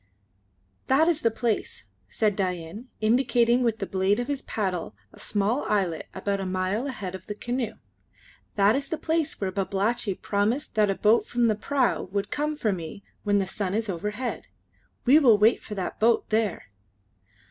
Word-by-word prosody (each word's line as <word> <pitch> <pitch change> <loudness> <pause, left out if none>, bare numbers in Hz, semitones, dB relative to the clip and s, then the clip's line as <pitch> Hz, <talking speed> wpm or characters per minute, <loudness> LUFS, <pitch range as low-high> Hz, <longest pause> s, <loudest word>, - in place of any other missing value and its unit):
"That 285 +5 +4
is 325 -3 +2
the 230 - +3
place," 225 0 -2 0.3
said 210 - +1
Dain, 185 +4 -3
indicating 240 +1 +3
with 230 -3 +1
the 195 - -3
blade 190 +2 +1
of 245 - -2
his 285 -2 -2
paddle 185 - -3 0.2
a - - -15
small 210 +6 0
islet 185 -6 0
about 200 +1 -1
a 195 - -3
mile 185 +7 -1
ahead 205 -9 -5
of 190 -1 -9
the 210 - -4
canoe 240 +1 -3 0.8
"that 205 +2 +4
is 275 0 -2
the 320 - -2
place 320 -1 -1
where 195 -2 -1
Babalatchi 195 +2 -1
promised 215 +11 -1
that 210 -2 +3
a 195 - +1
boat 215 +4 +3
from 240 -1 +1
the 220 -2 +3
prau 255 -2 0
would 200 +1 -2
come 300 +1 -1
for 215 -7 +1
me 170 +2 -7 0.2
when 205 -1 +2
the 195 - +1
sun 190 0 -3
is 220 -1 -1
overhead. 210 +7 -3 0.6
We 275 +5 +7
will 240 -8 +6
wait 215 +3 +4
for 210 - -7
that 190 -2 -4
boat 230 +1 +3
there." 215 - 0
210 Hz, 180 wpm, -26 LUFS, 195-240 Hz, 0.8 s, We